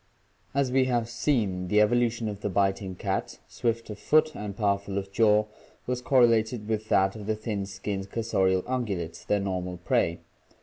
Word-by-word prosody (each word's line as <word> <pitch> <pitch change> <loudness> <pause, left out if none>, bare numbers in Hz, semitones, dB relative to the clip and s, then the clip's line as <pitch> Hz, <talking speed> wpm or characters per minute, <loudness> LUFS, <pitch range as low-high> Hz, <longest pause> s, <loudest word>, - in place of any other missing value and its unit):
As 140 -2 +1
we 130 0 +3
have 120 -3 0
seen, 115 -7 0
the 105 +3 +3
evolution 115 +1 +2
of 105 -1 -5
the 105 - -1
biting 95 -1 0
cats, - - -3
swift 115 -1 -2
of 105 - -8
foot 155 +1 +3
and 100 -1 -6
powerful 100 -2 0
of 95 0 -4
jaw, 105 0 +4 0.4
was 125 0 -2
correlated 115 -4 +3
with 110 -1 -2
that 95 +1 +3
of 105 -2 -8
the 110 - +1
thin 105 -2 -3
skinned 95 0 -5
cursorial 95 -5 +1
ungulates, 100 -10 -3
their 105 - +1
normal 90 -2 -3
prey. 85 -1 +1
105 Hz, 170 wpm, -27 LUFS, 95-115 Hz, 0.4 s, jaw